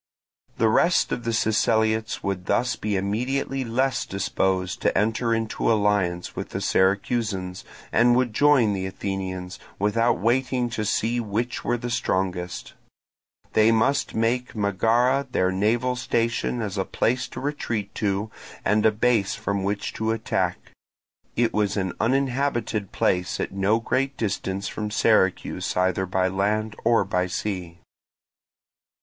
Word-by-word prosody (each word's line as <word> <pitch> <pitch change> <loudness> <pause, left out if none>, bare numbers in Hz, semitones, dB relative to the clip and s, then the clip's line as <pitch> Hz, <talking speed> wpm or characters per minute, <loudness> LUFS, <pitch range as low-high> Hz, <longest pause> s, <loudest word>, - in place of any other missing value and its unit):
The 115 - +3
rest 170 +10 +3
of 120 - -3
the 115 - 0
Siceliots 110 0 +1
would 95 -2 -3
thus 115 +3 +1
be 105 -1 -2
immediately 125 +7 -1
less 130 +3 0
disposed 95 -1 -1
to - - +1
enter 115 +2 +1
into 115 0 0
alliance 100 -5 +1
with - - -5
the - - -4
Syracusans, 95 -1 0 0.3
and 120 +1 +4
would 125 -3 +1
join 135 -5 +4
the 95 -1 -2
Athenians, 95 -1 -5 0.2
without 115 +4 +2
waiting 125 +4 0
to 110 -2 -2
see 115 +3 0
which 115 +2 -2
were 120 - 0
the 120 0 -5
strongest. 95 -6 -2 0.8
They 110 +1 +5
must 115 +5 +1
make 120 +3 0
Megara 115 +7 +2
their 95 -4 +2
naval 115 +6 +1
station 115 -1 -1
as 100 -2 -3
a - - +2
place 125 +2 0
to - - -8
retreat 120 -8 -3
to 105 +1 -1 0.3
and 105 0 +3
a - - +4
base 110 -2 +1
from 100 0 -2
which 100 +1 -2
to 110 0 -2
attack: 115 0 -2 0.6
it 115 -1 +1
was 105 -1 0
an 95 -2 -1
uninhabited 125 -5 0
place 90 -1 0
at - - -2
no 100 +3 +1
great 135 +3 -1
distance 100 -2 -2
from 105 -1 -4
Syracuse 105 -5 +1
either 95 +1 +1
by 95 0 +1
land 105 +3 -1
or 115 -2 +4
by 90 -1 0
sea. 90 -3 -4
110 Hz, 140 wpm, -24 LUFS, 95-120 Hz, 0.8 s, They